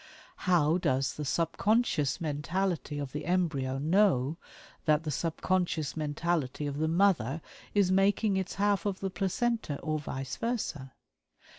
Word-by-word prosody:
How 170 -1 +4
does 135 -4 +1
the 150 - -5
subconscious 170 - +1
mentality 160 +1 -2
of 140 -2 -4
the 150 +2 -5
embryo 155 -8 0
know 160 -2 +2 0.5
that 155 0 +3
the 155 - -2
subconscious 165 -1 -1
mentality 150 -2 -1
of 145 0 -3
the 160 - +1
mother 165 - +2 0.4
is 200 -3 +4
making 195 +2 +3
its 190 0 -2
half 205 -1 +1
of 195 -2 -2
the 195 -1 -3
placenta, 195 - -1
or 155 -1 -1
vice 135 -2 -5
versa? 185 - -3
165 Hz, 135 wpm, -30 LUFS, 145-190 Hz, 0.5 s, How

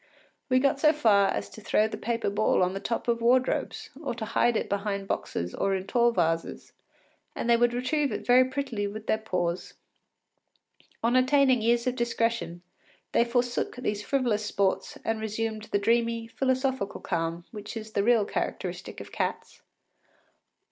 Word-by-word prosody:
We 255 - +4
got 275 +1 +2
so 305 +1 +5
far 210 -9 +4
as - - -2
to 220 - -11
throw 215 +1 +2
the 220 - -5
paper 230 0 -2
ball 205 -2 +2
on 180 +1 0
the 195 - -3
top 230 +4 -3
of 235 -1 +1
wardrobes, 250 +2 +1
or 280 - -3
to 225 -2 -4
hide 230 +1 +2
it - - -2
behind 200 -1 -2
boxes 90 - -3
or 195 0 0
in 190 0 -4
tall 240 +3 +3
vases, 165 -5 -1 0.6
and - - -3
they 235 - +6
would 240 0 +3
retrieve 260 +4 0
it - - -4
very 250 +1 +6
prettily 260 -6 -3
with 215 +2 -7
their 220 - +1
paws. 180 -5 -2 1.3
On 235 +2 +2
attaining 260 -1 +4
years 235 +1 +2
of 255 -1 0
discretion, 230 -7 -1 0.5
they - - +4
forsook 240 0 -1
these 210 -4 -2
frivolous 240 -6 0
sports 200 -2 -1
and 225 -1 -1
resumed 220 0 -3
the - - 0
dreamy, 230 +2 +1
philosophical 260 -2 -1
calm 170 -1 -3
which 210 +1 -7
is 220 0 -7
the 200 - +1
real 230 -2 +4
characteristic - - -4
of - - -11
cats. - - -3
230 Hz, 170 wpm, -27 LUFS, 205-245 Hz, 1.3 s, they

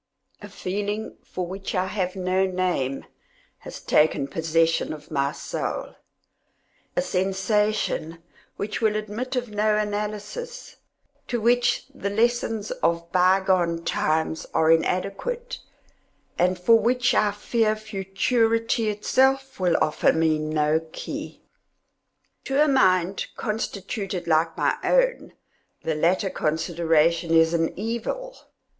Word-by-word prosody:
A 205 - -9
feeling, 205 +3 -4
for 185 - -4
which 190 +3 -5
I 185 0 +1
have 185 -1 -2
no 185 0 +1
name, 180 -8 -1 0.5
has - - -9
taken 150 -2 +2
possession 165 +3 +1
of 150 0 -12
my 140 -1 +1
soul - - -4 1.0
—a - - +3
sensation 195 - 0 0.4
which 210 +3 -3
will 215 -1 +2
admit 215 +5 -4
of 245 -3 -2
no 210 0 +2
analysis, 210 - -4 0.5
to 240 - -1
which 240 +2 +2
the 200 -7 -3
lessons 225 0 0
of 170 0 0
bygone 185 -2 +2
times 160 0 0
are 160 0 +4
inadequate, 195 - -1 0.8
and 180 +1 +2
for 225 +6 +5
which 245 +3 +2
I 210 - +3
fear 215 +2 0
futurity 220 +2 0
itself 265 +5 +1
will 180 -2 +2
offer 155 - +3
me 160 -1 +2
no 155 0 +1
key. - - -7 1.0
To 270 +1 0
a 305 - +5
mind 190 - +2
constituted 200 -3 -3
like 165 0 +1
my - - +1
own, - - +1 0.5
the 160 - 0
latter 180 +5 +1
consideration 165 +1 +1
is 165 0 +5
an 165 -1 +1
evil. 235 - -4
195 Hz, 115 wpm, -24 LUFS, 170-225 Hz, 1.0 s, for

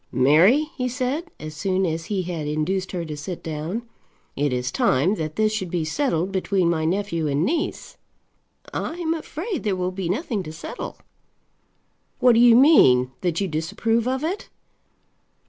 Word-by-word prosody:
"Mary," 175 - +4
he 250 -3 -1
said, 270 +7 -2
as 155 0 -7
soon 190 +3 0
as 165 -1 -2
he 195 -1 -2
had 170 -4 -4
induced 170 +5 -1
her 175 -2 -3
to 155 -2 -5
sit 160 +4 -6
down, 160 +8 -4 0.5
"it 145 0 0
is 125 0 -1
time 140 +11 +2
that 155 -6 -4
this 215 0 +2
should 190 -4 -3
be 165 -2 -1
settled 190 - 0
between 190 -1 +1
my 160 -2 -1
nephew 170 -2 -1
and 145 +3 +1
niece." 335 - -2 0.8
"I - - -3
am 335 -2 -1
afraid 330 - -4
there 205 -3 0
will 180 0 -2
be 185 -2 -4
nothing 230 - -1
to 155 - -7
settle." 160 +1 -7 1.2
"What 250 -1 +6
do 230 - +4
you 240 -1 +7
mean; 130 - +6
that 175 -3 0
you 195 - 0
disapprove 210 +9 -1
of 260 +2 -1
it?" 360 +6 -3
185 Hz, 170 wpm, -23 LUFS, 160-245 Hz, 1.2 s, you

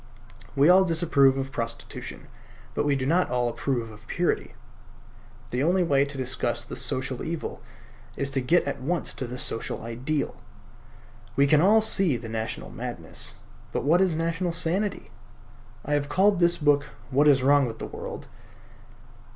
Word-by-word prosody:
We 140 +2 +5
all 185 +2 +7
disapprove 155 -6 +3
of 135 0 -3
prostitution; 115 -2 -6 0.5
but - - -1
we 145 - +3
do 130 -1 -2
not 175 +6 +2
all 125 -1 0
approve 120 -2 -2
of 105 +1 -15
purity. 175 0 -1 1.0
The 125 - -1
only 180 +5 +3
way 140 -4 +3
to 140 0 -8
discuss 125 -2 -2
the - - -7
social 130 -1 -2
evil 165 0 -5 0.6
is 140 0 -1
to 135 - 0
get 165 +8 +3
at 135 - -4
once 170 +5 -2
to 130 - -5
the 125 +1 -6
social 115 -2 -3
ideal. 130 +6 -3 1.0
We 140 - +4
can 150 +1 +4
all 210 +5 +5
see 190 - +3
the 115 -1 -8
national 110 0 -4
madness; - - -4 0.4
but - - -2
what 165 +6 +4
is 185 -4 +2
national 165 +2 -1
sanity? 180 +4 -1 0.7
I 145 - -1
have 145 -1 0
called 195 +4 +3
this 170 0 +4
book 145 -2 +3 0.3
"What 145 +3 +4
Is 135 -3 +5
Wrong 140 0 +4
with 115 -1 -6
the - - -5
World?" - - -7
140 Hz, 165 wpm, -26 LUFS, 130-170 Hz, 1.0 s, all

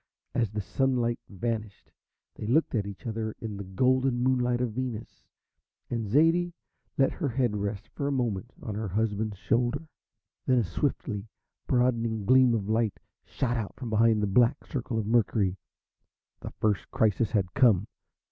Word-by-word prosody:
As 115 -4 +1
the 105 +1 -3
sunlight 120 +2 0
vanished 105 +1 -4 0.4
they 105 - -6
looked 150 +8 +2
at 105 -4 0
each 100 +5 -9
other 110 -1 -3
in 110 -2 -5
the 100 - -5
golden 130 +6 +2
moonlight 125 -1 +2
of 125 -2 0
Venus, 120 -2 -5 0.6
and 115 -3 -1
Zaidie 165 - +3 0.4
let 135 - +4
her 150 -6 -2
head 120 -3 0
rest 100 +1 -3
for 140 - -2
a - - 0
moment 120 -4 -1
on 110 - -4
her 105 +1 -3
husband's 105 +1 -1
shoulder. 125 - 0 0.6
Then 130 - +4
a 120 - +3
swiftly 105 - -2 0.4
broadening 115 -4 +1
gleam 130 +1 +5
of 100 -3 -2
light 110 -2 0 0.3
shot 125 -2 -1
out 110 -4 -4
from 120 -4 -6
behind 110 -1 +4
the - - +4
black 120 +7 +3
circle 125 -4 -3
of 110 - -1
Mercury. 105 -4 +2 0.8
The - - -6
first 105 -6 -1
crisis 110 0 +2
had 95 -5 0
come. 115 -8 +4
115 Hz, 160 wpm, -28 LUFS, 105-125 Hz, 0.8 s, gleam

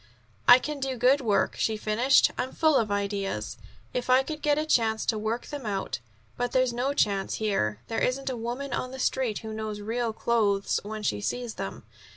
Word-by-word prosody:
"I 245 - +11
can 295 +3 -4
do 265 -1 -2
good 260 +4 +4
work," 215 -5 +1
she 220 -1 0
finished. 225 +6 +3
"I'm 255 - -3
full 315 -2 +3
of 225 -5 +2
ideas, 200 - -2 0.3
if 250 0 -3
I 255 +1 +6
could 305 +2 -6
get 295 -1 +2
a 305 - 0
chance 220 -7 +2
to 220 - +1
work 220 +3 -2
them 290 -2 -6
out. 195 - -3 0.4
But 245 0 -2
there's 255 -2 +2
no 260 +4 -1
chance 200 -6 +1
here. 110 - -1
There 225 - -2
isn't 270 +2 0
a - - -3
woman 245 +4 -4
on 255 - -2
the 265 - -8
Street 255 -4 0
who 220 - -5
knows 215 -1 -4
real 230 +2 -2
clothes 215 -3 +1
when 215 +1 -6
she 105 - 0
sees 230 - -3
them. - - -6
235 Hz, 200 wpm, -27 LUFS, 210-260 Hz, 0.4 s, I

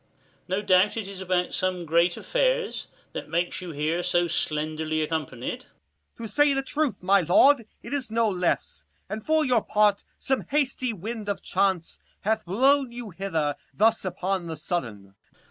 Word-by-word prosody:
No 190 +3 -1
doubt, 190 +3 +4
it 215 -3 -3
is 195 -1 -7
about 180 -1 0
some 185 -2 -1
great 170 +2 +2
affairs, - - 0 0.3
That - - -6
makes 175 +2 -1
you 180 - -6
here 155 +3 -1
so 175 0 +2
slenderly 155 0 -1
accompanied. 150 -6 -4 0.5
25 - - -40
Corn. 230 - -5
To - - -10
say 290 -1 +4
the 270 - 0
truth, 295 -5 -2
my 195 +1 +5
lord, 230 - +5 0.2
it 235 - -7
is 270 -4 -2
no 225 +1 +2
less, 180 -4 -1 0.2
And 215 0 -5
for 315 +2 +2
your 250 -4 +3
part 210 -1 +2
some 265 -1 -1
hasty 270 -3 0
wind 215 +1 -5
of 200 - -3
chance 190 -4 0 0.2
Hath 220 +1 0
blown 260 +7 +3
you 235 -3 -7
hither 165 -6 -1 0.2
thus 225 +2 +3
upon 185 -1 -2
the 160 -1 -5
sudden. 105 - -4
195 Hz, 170 wpm, -26 LUFS, 170-235 Hz, 0.5 s, my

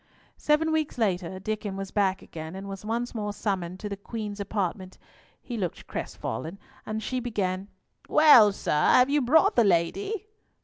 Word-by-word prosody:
Seven 310 +2 +2
weeks 310 -4 -1
later, 185 -4 -1
Diccon 210 0 -3
was 195 0 -5
back 195 -2 +1
again, 160 +2 -8
and 195 +1 -7
was 195 0 -7
once 235 +3 -2
more 210 -3 -3
summoned 185 -4 -3
to 210 - -4
the 200 - -4
Queen's 210 0 -6
apartment. 190 -2 -3 0.5
He 240 - -5
looked 180 -5 -4
crestfallen, 160 - -5 0.3
and 215 0 -3
she 255 - -2
began,— 200 -5 -2 0.4
"Well, 250 -9 +8
sir? 195 - -4 0.2
Have 255 +2 +5
you 295 0 +3
brought 280 +5 +4
the 235 - +5
lady?" 370 - 0
205 Hz, 165 wpm, -27 LUFS, 190-245 Hz, 0.5 s, Well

